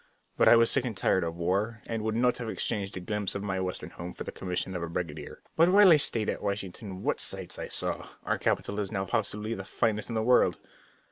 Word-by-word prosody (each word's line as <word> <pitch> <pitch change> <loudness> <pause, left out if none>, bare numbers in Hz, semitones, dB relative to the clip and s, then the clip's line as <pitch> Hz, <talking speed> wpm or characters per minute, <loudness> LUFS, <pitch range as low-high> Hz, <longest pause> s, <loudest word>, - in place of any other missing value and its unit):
But - - +4
I - - +9
was 115 0 +5
sick 135 - +2
and 115 -5 -4
tired 95 - +2
of 85 0 -3
war, 100 +6 -1
and 115 -1 -3
would 110 0 -1
not 125 +1 +2
have 115 -2 -4
exchanged 100 -3 -2
a - - -3
glimpse 105 +1 -2
of 100 - -3
my 95 -2 -2
Western 90 -1 -4
home 85 +1 -7
for - - -6
the - - -6
commission 90 0 -3
of 90 - -3
a 85 - -3
brigadier. 85 -3 -5
But 165 +2 +5
while 200 0 +7
I 155 - +8
stayed 115 -6 0
in - - -2
Washington 100 -1 -4
what - - 0
sights - - -3
I - - -4
saw! - - -2 0.2
Our - - 0
capital 100 +1 0
is 100 -2 -3
now 95 -3 -1
possibly 105 +3 -2
the 95 - -5
finest 105 +2 -1
in 115 - -3
the 110 - +1
world. 125 +2 +4
105 Hz, 245 wpm, -29 LUFS, 95-115 Hz, 0.2 s, I